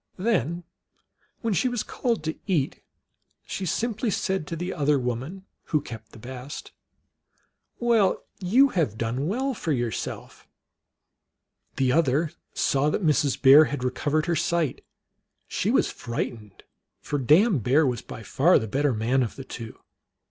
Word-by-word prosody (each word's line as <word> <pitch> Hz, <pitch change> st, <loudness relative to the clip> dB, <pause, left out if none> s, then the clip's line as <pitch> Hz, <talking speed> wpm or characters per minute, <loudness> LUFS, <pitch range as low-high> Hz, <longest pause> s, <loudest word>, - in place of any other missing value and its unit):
Then, 180 Hz, -, 0 dB, 0.8 s
when 230 Hz, -3 st, 0 dB
she 195 Hz, -, +2 dB
was 245 Hz, -3 st, -2 dB
called 235 Hz, -, -2 dB
to 160 Hz, 0 st, -2 dB
eat, 160 Hz, -9 st, 0 dB, 0.6 s
she 190 Hz, -, -4 dB
simply 225 Hz, +5 st, -1 dB
said 190 Hz, -4 st, -1 dB
to 165 Hz, -, -4 dB
the 175 Hz, +3 st, -3 dB
other 150 Hz, -2 st, +2 dB
woman, 130 Hz, +10 st, -4 dB, 0.2 s
who 155 Hz, -, +1 dB
kept 115 Hz, -6 st, -10 dB
the -, -, -13 dB
best, 130 Hz, +4 st, -8 dB, 0.5 s
" -, -, -44 dB, 0.3 s
Well, 230 Hz, -5 st, +2 dB, 0.2 s
you 235 Hz, +9 st, +4 dB
have 155 Hz, -, -1 dB
done 120 Hz, +6 st, -2 dB
well 260 Hz, +8 st, -1 dB
for 170 Hz, -8 st, -3 dB
yourself! 120 Hz, -5 st, -4 dB, 0.6 s
" -, -, -51 dB
The 130 Hz, -1 st, +2 dB
other 155 Hz, +1 st, +2 dB, 0.2 s
saw 140 Hz, +2 st, +2 dB
that 175 Hz, -, -1 dB
Mrs. 150 Hz, -2 st, +2 dB
Bear 140 Hz, +3 st, +8 dB
had 140 Hz, -2 st, -4 dB
recovered 145 Hz, +4 st, 0 dB
her 175 Hz, -, 0 dB
sight. 170 Hz, -2 st, 0 dB, 0.6 s
She -, -, -1 dB
was -, -, +2 dB
frightened, 115 Hz, -3 st, -5 dB, 0.4 s
for 145 Hz, 0 st, -3 dB
Dame 160 Hz, -, +4 dB
Bear 135 Hz, +8 st, +3 dB
was 125 Hz, -4 st, -1 dB
by 110 Hz, -, -9 dB
far 160 Hz, +11 st, +4 dB
the 110 Hz, -, -2 dB
better 135 Hz, +3 st, +1 dB
man 120 Hz, +5 st, +1 dB
of 120 Hz, -, -2 dB
the 135 Hz, -, -8 dB
two. 115 Hz, -4 st, -8 dB
150 Hz, 155 wpm, -25 LUFS, 125-185 Hz, 0.8 s, Bear